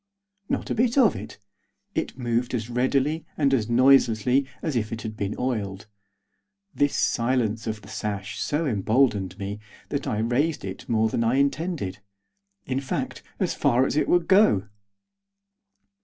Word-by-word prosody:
Not - - -2
a - - +2
bit 245 +2 +1
of 245 -7 +5
it. - - -8 0.6
It - - -3
moved 120 0 -1
as 115 0 -4
readily 135 +5 +1
and 140 -3 +2
as 115 -4 +1
noiselessly 125 0 +4 0.2
as 155 -5 -1
if 110 -2 -1
it 115 0 -5
had 110 -1 -5
been 100 -1 -3
oiled. 105 -6 -2 0.9
This 145 0 +1
silence 115 -2 0
of 110 -1 -4
the - - -13
sash 100 -2 -4
so 150 +3 0
emboldened 105 - +1
me 100 0 -5 0.3
that 140 -1 -3
I 105 - -1
raised 125 +6 0
it 95 0 -7
more 110 -1 +3
than 115 +1 0
I 115 +3 +2
intended. 140 - -1 0.7
In 130 0 -1
fact, 135 -2 -4 0.2
as - - 0
far 125 +2 +3
as - - -1
it 150 - +2
would 175 -1 +2
go. 190 - +4
120 Hz, 155 wpm, -25 LUFS, 110-140 Hz, 0.9 s, of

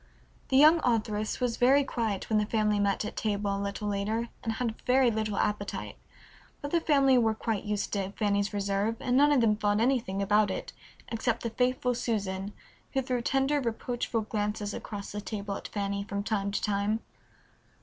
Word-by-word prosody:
The 265 - +3
young 310 +4 +7
authoress 215 -3 0
was 245 -2 0
very 270 +3 +5
quiet 225 -7 -2
when 215 -1 +2
the 210 - +1
family 215 -2 +1
met 200 +1 +1
at - - -6
table 205 -2 -1
a 200 - -3
little 200 +1 -3
later, 215 +3 -1
and 225 - -1
had 225 -1 -3
very 255 -1 +4
little 215 -2 -2
appetite, 205 -1 -2 0.6
but 285 - -6
the 340 - +2
family 275 -5 +4
were 220 -2 +2
quite 220 -2 -2
used 210 -1 -2
to 195 -1 -1
Fanny's 200 -1 0
reserve, 200 +2 0
and 250 - 0
none 290 +2 +5
of 280 -4 +4
them 215 -2 +4
thought 210 0 +1
anything 230 -5 +1
about 205 +1 +3
it 190 - -5 0.4
except 230 0 -1
the 230 - -2
faithful 250 +1 +1
Susan, 200 -4 -2 0.4
who 270 - +1
threw 250 -1 -1
tender 270 +4 +1
reproachful 235 -1 -2
glances 210 -1 -2
across 200 -2 -6
the 210 - -4
table 200 -1 -4
at - - -6
Fanny 200 -1 -2
from 200 -1 -4
time 200 -2 -1
to 200 - -1
time. 210 +2 0
215 Hz, 185 wpm, -29 LUFS, 205-245 Hz, 0.6 s, young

